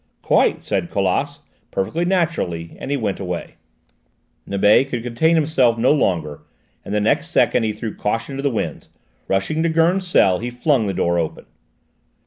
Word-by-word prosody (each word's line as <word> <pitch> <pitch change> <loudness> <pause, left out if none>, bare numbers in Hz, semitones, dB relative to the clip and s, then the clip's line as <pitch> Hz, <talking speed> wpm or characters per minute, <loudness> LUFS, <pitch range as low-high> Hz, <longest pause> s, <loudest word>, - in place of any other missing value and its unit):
"Quite," - - +2
said - - -2
Colas, - - -1 0.3
perfectly 160 - -2
naturally, 165 - -1
and - - -6
he 140 - 0
went 105 -6 -2
away. 90 -2 -5 0.9
Nibet 105 +6 +4
could 120 -4 -3
contain 125 +8 +2
himself 140 -7 +2
no 120 +3 +3
longer, 85 - -1 0.4
and - - -8
the 105 - +1
next 105 - +1
second - - +2
he 110 -1 0
threw 110 +1 -5
caution 115 +6 -3
to 135 - -4
the 140 - +1
winds: 115 - -4 0.4
rushing 100 +12 0
to 170 - +1
Gurn's 170 +4 +2
cell 95 - +3
he 120 - -4
flung 125 -2 +1
the 95 - -2
door 85 0 +1
open. 80 -2 -4
115 Hz, 165 wpm, -20 LUFS, 95-155 Hz, 0.9 s, Nibet